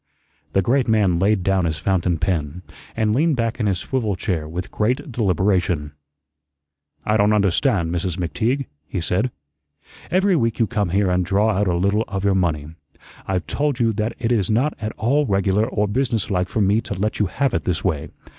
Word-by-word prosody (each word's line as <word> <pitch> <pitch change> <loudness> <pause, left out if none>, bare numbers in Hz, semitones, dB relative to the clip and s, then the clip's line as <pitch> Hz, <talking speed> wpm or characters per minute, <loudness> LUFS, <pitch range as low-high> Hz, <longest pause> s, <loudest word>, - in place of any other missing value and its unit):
The 95 - +3
great 130 +5 +2
man 100 -6 +3
laid 100 0 +2
down 95 -2 +2
his 80 -2 -1
fountain 90 -1 0
pen 85 -1 -2 0.3
and 110 -1 +1
leaned 155 +3 +2
back 115 0 -1
in 110 - +1
his 95 -2 +1
swivel 110 -1 -2
chair 80 -4 -2
with 90 +3 -5
great 130 +6 -1
deliberation. 95 -7 +1 1.1
"I 105 0 +2
don't 105 0 +3
understand, 100 - +2
Mrs. 90 0 -2
McTeague," 115 +10 -1 0.2
he 95 - -3
said. 90 +8 0 0.8
"Every 190 +1 +3
week 115 -6 +1
you 115 - +3
come 105 -4 -1
here 95 +1 +2
and 90 0 +2
draw 100 +4 +2
out 100 0 0
a 90 - +1
little 100 +5 +1
of 95 -1 -4
your 100 - +3
money. 80 -5 0 0.6
I've 95 -1 -1
told 145 -3 -1
you 115 -2 +2
that 110 +2 -2
it 120 -1 -1
is 105 -6 +1
not 125 +8 +2
at 110 0 -3
all 140 +6 +1
regular 100 +1 +2
or 105 -4 0
business 115 -2 -1
like 90 -1 0
for 110 - -1
me 100 +3 +3
to 100 - -5
let 105 +4 -2
you 105 - +2
have 140 +9 -1
it 85 - -1
this 90 0 -1
way. 75 -3 -1
100 Hz, 195 wpm, -21 LUFS, 90-115 Hz, 1.1 s, The